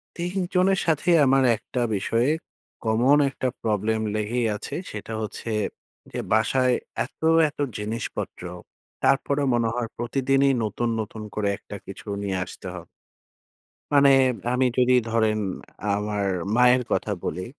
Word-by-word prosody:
৩ 175 +2 -4 0.2
জনের 190 +1 +4
সাথেই 165 +2 +3
আমার 135 0 +4
একটা 125 +3 -5 0.2
বিষয়ে 115 +7 +1 0.6
কমন 120 +6 +4
একটা 130 - -3 0.2
প্রবলেম 110 0 0
লেগেই 115 +3 0
আছে। - - -6 0.2
সেটা 110 +1 -6
হচ্ছে 110 +1 -5 0.6
যে - - -4
বাসায় 125 +3 +3 0.3
এত, - - -18 0.3
এত 145 - -21 0.2
জিনিসপত্র, 105 -3 -4 0.6
তারপরও 140 +1 +2
মনে 120 -1 +2
হয় 120 -2 -1
প্রতিদিনই 135 +3 +2
নতুন, 115 +3 -2
নতুন 110 0 -7
করে 105 -1 0
একটা - - -10
কিছু - - -10 0.2
নিয়ে 95 -2 -1
আসতে 95 - -10
হ - - -6 1.1
মানে 140 -1 +6 0.4
আমি 130 +1 +2
যদি 125 0 +5
ধরেন 110 -1 +2 0.6
আমার 105 -1 -1 0.3
মায়ের 125 0 +5
কথা 105 - 0
বলি। 90 +1 -3
120 Hz, 130 wpm, -24 LUFS, 110-135 Hz, 1.1 s, মানে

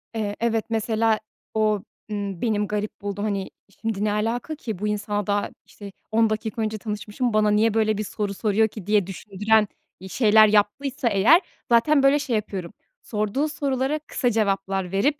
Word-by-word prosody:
Eee, 205 -2 -2
evet. 225 -1 0
Mesela, 225 0 +1 0.3
o, 215 -2 +1 0.3
ımm, 200 -3 -4
benim 210 -3 0
garip 210 0 -4
bulduğum, 205 0 -4
hani, 200 -2 -2 0.3
şimdi, 220 -3 -2
"Ne 210 - +1
alaka 230 +8 -2
ki? 220 - -6
Bu 210 - -1
insana 205 -1 -2
daha, 205 0 0 0.2
işte, 200 -1 -11 0.2
10 225 0 +3
dakika 220 +1 -3
önce 215 0 -1
tanışmışım, 210 +2 -3
bana 215 -1 +3
niye 215 +1 +3
böyle 215 -2 +2
bir 215 - -1
soru 205 0 -3
soruyor 215 +2 +2
ki?" 205 -3 -10
diye 205 -3 +3
düşündüren, 210 +3 +1 0.3
iii, 190 +1 -10
şeyler 215 -1 +6
yaptıysa 235 +5 +1
eğer 225 - +5 0.3
zaten 275 +5 +4
böyle, 275 +2 +5
şey 260 -5 -1
yapıyorum; 195 -3 -4 0.3
sorduğu 215 +7 -1
sorulara 280 0 -1
kısa 260 -4 -1
cevaplar 195 -4 0
verip 280 +10 +1
215 Hz, 170 wpm, -24 LUFS, 205-230 Hz, 0.3 s, şeyler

